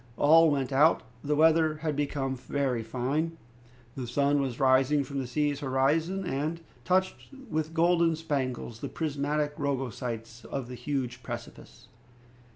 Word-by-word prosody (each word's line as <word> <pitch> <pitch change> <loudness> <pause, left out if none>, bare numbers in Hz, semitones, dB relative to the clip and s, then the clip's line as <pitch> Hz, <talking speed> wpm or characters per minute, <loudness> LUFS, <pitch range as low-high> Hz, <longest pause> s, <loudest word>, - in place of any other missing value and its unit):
All 160 +2 +6
went 135 -3 -1
out. 150 +1 +4 0.2
The 150 +1 0
weather 160 0 +4
had 155 -2 0
become 140 -2 -1
very 130 -1 -1
fine. 135 +8 -2 0.6
The 130 -2 -5
sun 140 +3 +2
was 130 -4 -3
rising 135 +2 +4
from 140 +1 -4
the 130 - -3
sea's 145 +2 0
horizon, 155 +8 +1
and 155 +3 -2 0.2
touched 185 +1 0 0.2
with 160 +1 -2
golden 170 -1 +3
spangles 130 -7 -3
the - - -5
prismatic 150 -1 -1
rugosities 120 -4 -3
of 130 -3 -5
the - - -6
huge 125 -2 -3
precipice. 120 -1 -9
140 Hz, 140 wpm, -28 LUFS, 130-155 Hz, 0.6 s, All